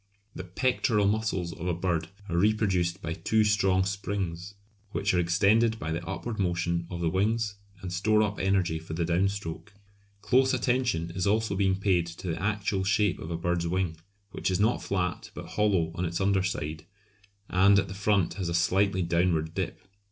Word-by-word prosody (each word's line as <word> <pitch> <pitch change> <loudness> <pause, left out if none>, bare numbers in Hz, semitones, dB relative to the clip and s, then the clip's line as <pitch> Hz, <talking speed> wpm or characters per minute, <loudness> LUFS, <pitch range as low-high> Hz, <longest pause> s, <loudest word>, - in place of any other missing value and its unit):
The 95 - -6
pectoral 105 +2 +1
muscles 100 -5 0
of 90 -2 -6
a 90 - 0
bird 85 -2 -1 0.2
are 85 - -3
reproduced 95 -2 +1
by 85 - -2
two 110 +5 +1
strong 95 -3 +2
springs 95 -1 -4 0.4
which 100 - 0
are 90 - +3
extended 100 +6 +3
by 80 -5 -4
the 85 +2 -3
upward 110 +5 -4
motion 85 -2 0
of 85 -1 -5
the 85 - +1
wings 105 +3 0 0.3
and 90 -1 -4
store 105 +4 +3
up 105 -1 -2
energy 95 -4 +1
for 80 0 -7
the 85 0 0
down 90 +3 +2
stroke. 100 +1 -7 0.5
Close 130 +1 +3
attention 120 -9 0
is 95 +2 -2
also 110 0 +1
being 95 -1 +2
paid 95 -3 +1
to 85 +2 -7
the 80 +1 -3
actual 100 -1 0
shape 100 -1 +1
of 80 - -7
a 85 - -2
bird's 85 0 -1
wing, 90 -1 -1 0.4
which - - -2
is 95 0 0
not 110 +4 +2
flat 90 -2 -2
but - - -8
hollow 95 -6 +1
on 90 - -3
its 85 -1 -2
under 95 0 +2
side, 80 -3 -4 0.6
and 100 +2 +5
at 100 - +2
the 95 - -7
front 100 -2 +1
has 95 -4 -3
a 85 - -1
slightly 95 +2 +2
downward 85 -2 +1
dip. 95 0 -4
95 Hz, 190 wpm, -28 LUFS, 85-100 Hz, 0.6 s, and